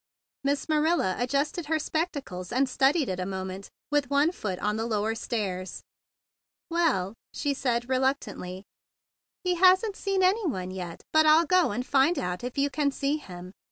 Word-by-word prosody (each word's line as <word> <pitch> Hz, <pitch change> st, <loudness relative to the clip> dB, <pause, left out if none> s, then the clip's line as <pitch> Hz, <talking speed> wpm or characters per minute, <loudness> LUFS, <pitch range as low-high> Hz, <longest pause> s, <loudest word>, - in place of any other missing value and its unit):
Miss 280 Hz, 0 st, 0 dB
Ma¬ 305 Hz, -1 st, +1 dB
rilla 315 Hz, -, +2 dB
adjusted 280 Hz, +6 st, -1 dB
her 315 Hz, +1 st, +2 dB
spectacles, 290 Hz, -, -3 dB
and 265 Hz, +2 st, +2 dB
studied 270 Hz, +3 st, +2 dB
it 185 Hz, -1 st, -3 dB
a 185 Hz, -, -2 dB
moment 190 Hz, 0 st, -5 dB, 0.2 s
with 290 Hz, -3 st, +1 dB
one 285 Hz, +3 st, +3 dB
foot 200 Hz, -, -4 dB
on 210 Hz, +3 st, -1 dB
the 225 Hz, +1 st, -2 dB
lower 215 Hz, 0 st, 0 dB
stairs. 195 Hz, -5 st, -4 dB, 0.9 s
"Well," 290 Hz, -, +1 dB, 0.2 s
she 285 Hz, -1 st, 0 dB
said 240 Hz, -3 st, -1 dB
reluctantly, 255 Hz, -8 st, -1 dB, 0.8 s
"he 360 Hz, -1 st, +1 dB
hasn't 375 Hz, +3 st, +5 dB
seen 390 Hz, -2 st, 0 dB
any 385 Hz, +2 st, +3 dB
one 185 Hz, -, -3 dB
yet; 180 Hz, -3 st, -7 dB
but 315 Hz, 0 st, +5 dB
I'll 315 Hz, +2 st, +6 dB
go 365 Hz, +2 st, +3 dB
and 245 Hz, +5 st, -3 dB
find 280 Hz, +6 st, +3 dB
out 180 Hz, +3 st, -3 dB
if 250 Hz, +2 st, -5 dB
you 280 Hz, 0 st, +1 dB
can 290 Hz, -1 st, +1 dB
see 280 Hz, +2 st, -1 dB
him. 180 Hz, -9 st, -10 dB
270 Hz, 170 wpm, -27 LUFS, 195-315 Hz, 0.9 s, I'll